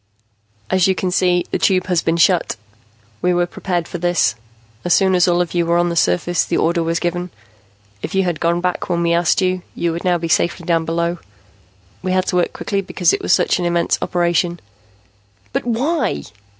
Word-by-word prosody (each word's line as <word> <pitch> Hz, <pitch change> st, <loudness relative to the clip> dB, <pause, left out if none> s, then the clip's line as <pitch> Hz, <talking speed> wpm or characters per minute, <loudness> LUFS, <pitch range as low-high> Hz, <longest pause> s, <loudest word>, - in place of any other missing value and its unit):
"As 185 Hz, -1 st, +3 dB
you 190 Hz, -, +2 dB
can 185 Hz, 0 st, -2 dB
see, 180 Hz, -1 st, +2 dB
the -, -, -1 dB
Tube 185 Hz, -2 st, +2 dB
has 180 Hz, -3 st, +1 dB
been 165 Hz, +1 st, 0 dB
shut. 170 Hz, 0 st, +3 dB, 0.7 s
We 180 Hz, 0 st, +2 dB
were 175 Hz, 0 st, +2 dB
prepared 175 Hz, -1 st, -3 dB
for 175 Hz, -, -6 dB
this. 175 Hz, -8 st, +2 dB, 0.5 s
As 175 Hz, -1 st, +3 dB
soon 190 Hz, -1 st, +3 dB
as 180 Hz, 0 st, +4 dB
all 175 Hz, 0 st, +3 dB
of 175 Hz, -, -3 dB
you 175 Hz, -1 st, +2 dB
were 170 Hz, 0 st, +2 dB
on 175 Hz, 0 st, +2 dB
the 170 Hz, -, -3 dB
surface, 165 Hz, -, +1 dB
the -, -, -1 dB
order 170 Hz, +1 st, +1 dB
was 165 Hz, 0 st, -1 dB
given. 175 Hz, +1 st, -2 dB, 0.7 s
If -, -, -5 dB
you 190 Hz, -, +3 dB
had 175 Hz, -3 st, -2 dB
gone 170 Hz, +1 st, +1 dB
back 180 Hz, 0 st, -2 dB
when 170 Hz, -1 st, 0 dB
we 170 Hz, 0 st, +2 dB
asked 170 Hz, +3 st, +2 dB
you, 185 Hz, 0 st, 0 dB
you 170 Hz, -, -1 dB
would 170 Hz, +1 st, -5 dB
now 180 Hz, -2 st, +2 dB
be 165 Hz, 0 st, -4 dB
safely 170 Hz, +1 st, 0 dB
down 165 Hz, -1 st, +1 dB
below. 170 Hz, +1 st, -1 dB, 0.8 s
We 185 Hz, -, -1 dB
had 185 Hz, 0 st, +1 dB
to 180 Hz, -, 0 dB
work 175 Hz, -, +1 dB
quickly 200 Hz, -1 st, -2 dB
because 180 Hz, -2 st, +1 dB
it -, -, -1 dB
was -, -, -1 dB
such -, -, +3 dB
an 175 Hz, -, -1 dB
immense 170 Hz, 0 st, +1 dB
operation." 175 Hz, 0 st, 0 dB, 0.9 s
"But -, -, -1 dB
why?" 270 Hz, +8 st, 0 dB
175 Hz, 210 wpm, -19 LUFS, 170-185 Hz, 0.9 s, as